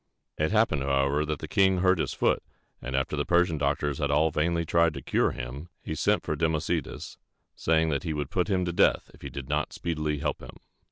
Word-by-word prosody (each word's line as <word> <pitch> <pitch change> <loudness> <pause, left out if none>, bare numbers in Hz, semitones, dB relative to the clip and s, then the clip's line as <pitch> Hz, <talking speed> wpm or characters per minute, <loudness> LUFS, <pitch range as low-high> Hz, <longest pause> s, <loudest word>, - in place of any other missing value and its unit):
It 80 +4 0
happened, 110 -10 +2
however, 70 +2 +1
that 75 -1 -1
the - - -7
king 95 -1 +3
hurt 95 -1 +3
his - - -1
foot; - - +1 0.4
and 65 +2 -4
after 65 +3 0
the 75 - 0
Persian 85 -1 +2
doctors 70 0 0
had 70 -2 0
all 75 +2 +3
vainly 85 +2 0
tried 85 -1 +2
to 70 - -5
cure - - +2
him, 65 +6 -7
he - - -4
sent 80 - +1
for - - -2
Democedes, 80 -2 -2 0.4
saying 80 0 +2
that 70 -2 0
he 80 - -3
would 75 -2 -4
put 90 -2 +1
him 95 -2 +1
to 85 - -2
death - - +2
if - - -18
he - - -6
did 70 -2 -7
not 75 0 -1
speedily 75 -3 -2
help 70 0 -2
him. - - -11
75 Hz, 220 wpm, -27 LUFS, 70-85 Hz, 0.4 s, king